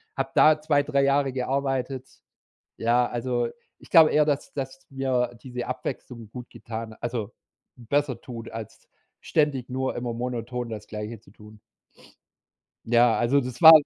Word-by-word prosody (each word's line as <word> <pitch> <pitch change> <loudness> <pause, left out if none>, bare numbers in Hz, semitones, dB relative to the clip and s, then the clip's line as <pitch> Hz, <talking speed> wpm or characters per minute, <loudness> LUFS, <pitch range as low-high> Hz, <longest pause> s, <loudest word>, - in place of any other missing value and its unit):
habe - - -1
da 155 0 +6
2, 150 -2 +3
3 140 -1 +1
Jahre 140 -1 +2
gearbeitet. 135 0 -1 0.7
Ja, 120 +2 +3
also, 120 0 -1 0.3
ich - - -17
glaube 160 -3 +8
eher, 150 - +4
dass 145 -2 -1
dass 135 -1 -6
mir 130 -2 0
diese 125 -2 -5
Abwechslung 125 -2 -5
gut 125 +1 -9
getan 110 -1 -7
also, 115 -2 -3 0.4
besser 130 +1 -1
tut, 115 -2 -8
als 115 -2 -9 0.3
ständig 140 -5 0
nur 130 +1 -2
immer 120 -1 -3
monoton 120 0 -3
das 105 -1 -7
Gleiche 105 +1 -6
zu 110 - -20
tun. 105 +1 -15 1.3
Ja, 120 0 +4
also, 125 +4 +3
das 125 +2 -6
war 160 -1 +12
125 Hz, 145 wpm, -26 LUFS, 115-135 Hz, 1.3 s, war